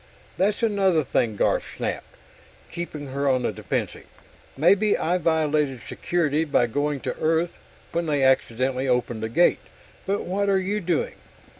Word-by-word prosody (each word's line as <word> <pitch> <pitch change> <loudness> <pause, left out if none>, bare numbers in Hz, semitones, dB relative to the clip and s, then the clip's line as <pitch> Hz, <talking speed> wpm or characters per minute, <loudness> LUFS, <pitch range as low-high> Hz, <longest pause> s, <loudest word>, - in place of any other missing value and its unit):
"That's 205 +5 0
another 195 -7 +3
thing!" 115 -4 0
Garf - - +2 0.2
snapped, - - -4 0.6
keeping 155 -5 -6
her 140 0 +1
on 130 -2 +2
the - - 0
defensive. - - -4 0.5
"Maybe 200 +8 +4
I 180 +2 0
violated 150 -5 +1
Security 160 -3 0
by 145 -5 +2
going 145 +3 -1
to - - -3
Earth 165 +2 0 0.3
when 170 0 -1
they 145 -3 +1
accidentally 130 0 +1
opened 125 -3 0
the 110 - -2
gate, 175 +10 +3 0.5
but 200 +1 0
what 200 +2 -1
are 195 - +4
you 195 +3 -1
doing? 170 -3 -1
155 Hz, 150 wpm, -24 LUFS, 135-180 Hz, 0.6 s, Maybe